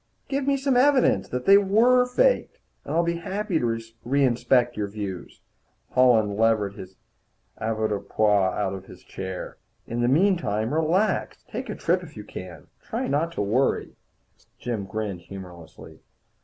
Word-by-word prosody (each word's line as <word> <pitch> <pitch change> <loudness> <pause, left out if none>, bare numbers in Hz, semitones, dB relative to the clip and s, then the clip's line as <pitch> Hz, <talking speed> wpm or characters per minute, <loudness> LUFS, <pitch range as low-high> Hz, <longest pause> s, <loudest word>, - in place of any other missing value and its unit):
"Give 275 0 -1
me 280 0 +3
some 270 -1 0
evidence 265 +1 +3
that 125 0 -4
they 200 +1 +8
were 235 +6 +4
faked, - - +1 0.3
and - - -4
I'll 170 - +3
be 170 0 -1
happy 195 0 -2
to 115 -1 -1 0.2
reinspect 125 -2 +2
your 105 -1 -2
views." 100 -3 -7 0.5
Holland 110 -5 +3
levered 110 -3 +2
his 95 -1 -11 0.6
avoirdupois 110 -2 +1
out 100 -2 -1
of 95 -1 -8
his - - -14
chair. 95 -1 -7 0.3
"In 120 +1 -3
the 120 - +2
meantime, 140 - +1
relax. 165 +7 0
Take - - -6
a - - -3
trip - - +1
if - - -12
you - - -7
can. - - -9 0.2
Try 245 +3 -3
not 160 +4 0
to 105 - -1
worry." 120 +7 0 0.6
Jim 115 -5 -4
grinned 100 -2 -4
humorlessly. 90 -4 -11
120 Hz, 150 wpm, -25 LUFS, -, 0.6 s, they